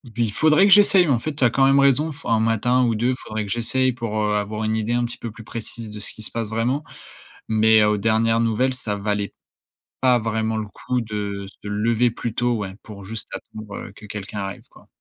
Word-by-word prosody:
il 115 -3 0
faudrait 155 - +4
que - - +2
j'essaye 195 -3 +6
en 125 -4 +3
fait. 155 +5 -3
Tu 135 - 0
as 120 - +6
quand 135 +3 +3
même 135 +1 +5
raison 140 +3 +3
f 145 - -9
1 115 - +3
matin 115 +3 +2
ou 115 - +1
2 120 +4 +1
faudrait 110 -4 -5
que 100 - -7
j'essaye 130 +3 +1
pour, 115 -3 -4
heu, 105 0 +1
avoir 105 +2 -3
une 110 0 0
idée 110 +2 -1
un 120 - +1
petit 120 - -2
peu 115 - -6
plus 115 0 -12
précise 115 0 -6
de 105 - -7
ce 105 - -2
qui 110 - -11
se - - -6
passe 115 -2 -3
vraiment 120 +6 -1 0.7
mais 110 0 +5
aux 105 0 +3
dernières 115 +1 +2
nouvelles, 115 +3 +1
ça 110 -5 -3
valait 100 0 -2 0.7
pas 125 -2 +5
vraiment 110 0 -1
le 110 - -3
coup 125 +4 -3
de 105 -3 -4
se 100 +1 -11
lever 115 +3 +1
plus 115 0 -5
tôt, 120 0 +1
ouais, 95 -3 -5
pour 100 -3 -11
juste 110 +2 -6
attendre 105 -2 -8
que 105 - -12
quelqu'un 105 0 -6
arrive 95 0 -6
quoi. - - -19
110 Hz, 230 wpm, -22 LUFS, 105-120 Hz, 0.7 s, j'essaye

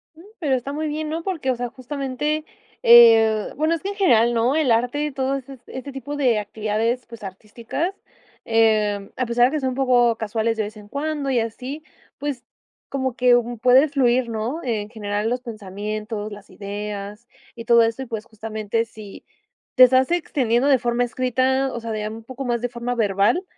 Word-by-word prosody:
Mm, 325 - -15 0.2
pero 285 -7 +1
está 270 +3 -4
muy 310 +1 -2
bien, 305 +1 -3
¿no?, 325 +1 -3
porque, 325 -9 -1
o 255 - -1
sea, 245 0 -4
justamente, 280 +4 -3 0.4
eh, 225 -2 +7
bueno, 310 +3 +1
es 330 - -2
que 390 - -3
en 405 - -5
general, 240 - +4
¿no?, 235 +5 +2
el 300 -7 +2
arte 245 +6 +1
y 300 - -3
todo 265 0 -1
ese 270 +1 -9
s 255 - -16
este 260 +2 -7
tipo 280 +2 -6
de 250 -6 +2
actividades, 215 +3 -2
pues, 230 -3 -11
artísticas, 225 - -4 0.5
em, 215 -3 +2
a 255 - -1
pesar 240 +1 +3
de 255 - +1
que - - 0
son 260 -1 -1
un 255 - -4
poco 245 -3 +3
casuales 225 +1 -1
de 220 - 0
vez 210 +1 -7
en 210 -1 -13
cuando 285 +2 -3
y 245 - +2
así, 255 +7 -5 0.4
pues, 280 -4 -4 0.5
como 260 -2 -2
que 250 0 +5 0.3
puedes 265 +4 +5
fluir, 250 -2 +2
¿no?, 230 +8 -3
en 215 -4 -2
general 210 -1 -2
los 250 +1 -2
pensamientos, 215 -1 -5
las 205 -1 -11
ideas 205 +2 -6 0.3
y 230 - -8
todo 235 0 +6
esto, 230 +3 0
y - - -8
pues, 225 -2 -5
justamente 220 0 -3
si 215 -3 -12 0.5
te 255 - +8
estás 260 +4 +3
extendiendo 270 -7 +1
de 275 - +5
forma 240 0 0
escrita, 255 +2 0
o 235 - -4
sea, 230 -1 -6
de 215 -1 -3
un 220 +1 -8
poco 260 +3 -7
más 240 -1 -1
de 245 - -2
forma 240 +1 -3
verbal, 215 - +2
240 Hz, 200 wpm, -22 LUFS, 220-270 Hz, 0.5 s, te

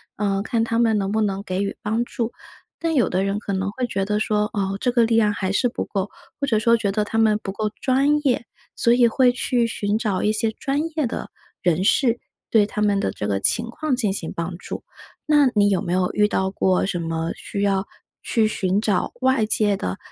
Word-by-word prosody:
呃， 195 -1 0
看 225 +2 0
他 230 0 0
们 225 -2 +3
能 195 -1 -1
不 220 +1 +1
能 200 -2 -1
给 185 -1 -2
予 200 - -4
帮 220 +3 0
助。 235 -1 -3 0.5
但 330 -1 -1
有 245 -8 +3
的 185 +1 0
人 195 +1 -1
可 205 -1 -4
能 190 +1 -1
会 250 +4 -2
觉 195 -5 -2
得 210 +1 0
说： 210 0 0
“哦， 195 -2 -1
这 245 - +2
个 240 -1 +3
力 230 0 +2
量 215 -2 +4
还 190 -2 -2
是 245 +5 +2
不 - - -4
够”， 195 0 -3 0.3
或 280 - 0
者 225 -5 +2
说 230 +2 +4
觉 210 -3 0
得 210 +1 0
“他 225 +2 -1
们 215 -1 +3
不 195 - -3
够 215 +2 -2
专 275 +3 +3
业”。 250 -3 +2 0.3
所 235 - +2
以 240 -1 +5
会 250 +2 +4
去 245 -1 0
寻 205 -2 -1
找 210 -4 -1
一 210 - +3
些 220 +1 +1
专 275 +6 -2 0.2
业 300 -5 +2
的 - - -5 0.3
人 175 0 +1
士， 240 +3 +3 0.3
对 215 -2 +4
他 210 0 -4
们 205 -1 +2
的 95 - -1
这 100 - -4
个 100 -1 0
情 230 - +1
况 290 +3 -1
进 225 -6 0
行 185 -4 -4
帮 170 +1 -4
助。 - - -7 0.4
那 295 -2 +5
你 205 -1 +4
有 195 -3 +1
没 175 -4 -2
有 180 0 +1
遇 210 0 +3
到 190 -2 -1
过 190 -1 +1
什 185 -2 -2
么 165 0 -2
需 200 - -5
要 195 -1 +1 0.3
去 225 -2 +1
寻 195 -1 0
找 205 -4 0
外 260 -4 +3
界 210 -1 +2
的 90 - -3
210 Hz, 250 characters per minute, -22 LUFS, 195-235 Hz, 0.5 s, 以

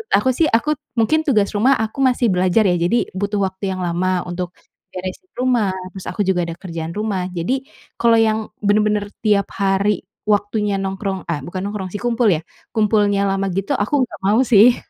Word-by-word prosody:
aku 210 +6 +2
sih, 310 +6 +2
aku 235 +5 +2 0.3
mungkin 315 +8 +2
tugas 210 -7 +3
rumah, 245 +7 +3
aku 220 +5 -5
masih 250 -4 +3
belajar 185 +3 +3
ya. 175 - +2
Jadi, 175 +8 +1
butuh 205 +1 -1
waktu 190 0 -2
yang 185 - -4
lama 180 +1 0
untuk 175 0 -4 0.4
beresin 185 - -7
rumah. 240 -7 +2 0.2
Terus 190 0 -9
aku 210 - -3
juga 185 -3 +1
ada 170 - -5
kerjaan 165 -2 -6
rumah. 205 -3 -2
Jadi, 255 +11 -2 0.3
kalau 235 -1 +4
yang 220 -1 +3 0.2
bener-bener 210 0 +2 0.2
tiap 200 -2 +3
hari 195 0 +1 0.2
waktunya 205 0 +1
nongkrong, 195 -1 -3
eh, 150 -4 -1
bukan 175 +6 -5
nongkrong 200 -2 -4
sih 205 - -4
kumpul 240 -1 +2
ya, 165 -5 +2 0.3
kumpulnya 205 -2 +2
lama 195 0 0
gitu 195 +2 -1
aku 205 +7 -1
nggak - - -11
mau 205 +3 +4
sih. 235 +1 +6
200 Hz, 180 wpm, -20 LUFS, 185-220 Hz, 0.4 s, sih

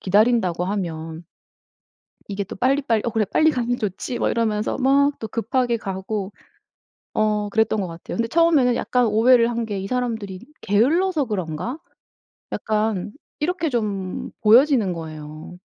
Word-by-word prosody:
기다린다고 195 -3 +2
하면. 165 -4 -4 1.0
이게 200 0 -3
또 - - -9
빨리빨리 255 -1 +1
'어 235 - -1
그래 220 0 +1
빨리 315 0 +4
가면 245 -2 -1
좋지.' 215 +4 -3
막 - - +1
이러면서 220 +1 -1
막 280 +2 +4
또 220 - -5
급하게 235 +1 0
가고 195 0 -4 0.8
어 210 -1 +1
그랬던 220 -1 +1
것 185 - -3
같아요. 165 +5 -7
근데 230 0 0
처음에는 305 -5 +3
약간 250 0 +1
오해를 230 +2 +4
한 235 -1 -2
게 205 -3 -4
'이 195 - -5
사람들이 225 -6 -3 0.2
게을러서 300 - +2
그런가?' 205 - -4 0.7
약간 215 -2 -1 0.3
이렇게 330 0 -1
좀 200 -6 -3
보여지는 230 -3 +5
거예요. 155 0 -8
220 Hz, 310 characters per minute, -22 LUFS, 195-250 Hz, 1.0 s, 보여지는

